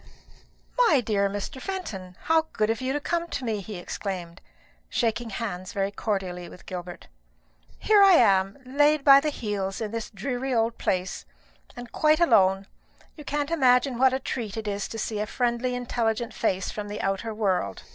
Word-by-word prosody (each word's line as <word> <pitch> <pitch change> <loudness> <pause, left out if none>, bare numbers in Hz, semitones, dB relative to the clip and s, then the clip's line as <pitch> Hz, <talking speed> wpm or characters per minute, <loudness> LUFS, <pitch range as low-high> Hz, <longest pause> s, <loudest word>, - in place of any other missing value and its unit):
"My 295 - +5
dear 200 -4 +1
Mr. 205 +6 -5
Fenton, 195 - -6
how 320 0 +2
good 215 0 +1
of 225 - -3
you 260 +1 -1
to 290 - -1
come 340 +3 -2
to 270 - -4
me!" 215 -3 -1
he 210 +2 -8
exclaimed, 175 -1 -6 0.5
shaking 230 0 -1
hands 195 -4 -5
very 195 0 -1
cordially 190 -4 -3
with - - -14
Gilbert. 180 -1 -7 0.7
"Here 425 -2 +4
I 390 -1 +8
am, 195 - +4
laid 290 +3 +3
by 275 -1 +9
the 305 +2 -1
heels 205 -7 -3
in 215 -2 -3
this 230 -1 -4
dreary 250 +4 -3
old 230 0 0
place, 185 0 -1 0.5
and 245 -1 -9
quite 310 +1 +3
alone. 195 - +4 0.5
You 300 - -10
can't 290 +2 -2
imagine 255 -4 +3
what 260 0 +5
a 260 - 0
treat 230 -5 -4
it 220 -1 -4
is 200 -1 -2
to 225 - -7
see 215 -1 -3
a 210 - -2
friendly 245 +2 -1
intelligent 235 -2 -1
face 190 -4 -1
from 210 -1 -5
the 205 - -5
outer 195 +3 -1
world." 190 - -1
225 Hz, 175 wpm, -26 LUFS, 195-265 Hz, 0.7 s, by